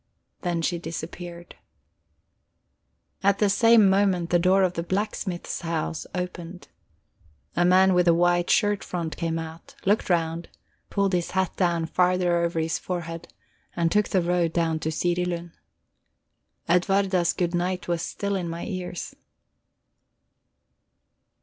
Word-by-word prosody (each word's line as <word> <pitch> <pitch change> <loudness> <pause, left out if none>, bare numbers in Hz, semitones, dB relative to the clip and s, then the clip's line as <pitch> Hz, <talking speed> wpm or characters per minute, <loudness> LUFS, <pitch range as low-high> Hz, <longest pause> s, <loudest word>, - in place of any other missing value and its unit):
Then 170 -2 -1
she 175 +1 0
disappeared. 170 +1 -8 1.6
At 200 0 +3
the 205 -1 +2
same 225 0 +6
moment 190 -3 +2
the 175 - +4
door 185 +2 +4
of 180 -1 +1
the 170 - -2
blacksmith's 190 -1 -3
house 165 -1 -3
opened. 180 -1 -6 0.9
A 175 - +3
man 185 +1 +5
with 180 0 +3
a 170 - +6
white 175 0 +2
shirt 205 -2 +2
front 170 -3 -4
came 165 -1 -2
out, 160 0 -8
looked 205 +1 +2
round, 165 -1 0 0.4
pulled 200 -2 0
his 175 -1 0
hat 190 -2 -1
down 170 -3 +1
farther 180 0 +2
over 170 -1 0
his 160 0 -1
forehead, 170 -2 -5 0.4
and 170 -1 +1
took 210 +2 +2
the 185 -3 +2
road 170 -1 +1
down 165 -2 0
to 160 - -2
Sirilund. 175 +1 -1 1.2
Edwarda's 185 0 +2
good 175 -1 -2
night 180 +1 -1
was 170 -1 -1
still 200 +3 -3
in 180 -3 -2
my 165 +1 -5
ears. 180 -2 -5
175 Hz, 135 wpm, -25 LUFS, 170-185 Hz, 1.6 s, same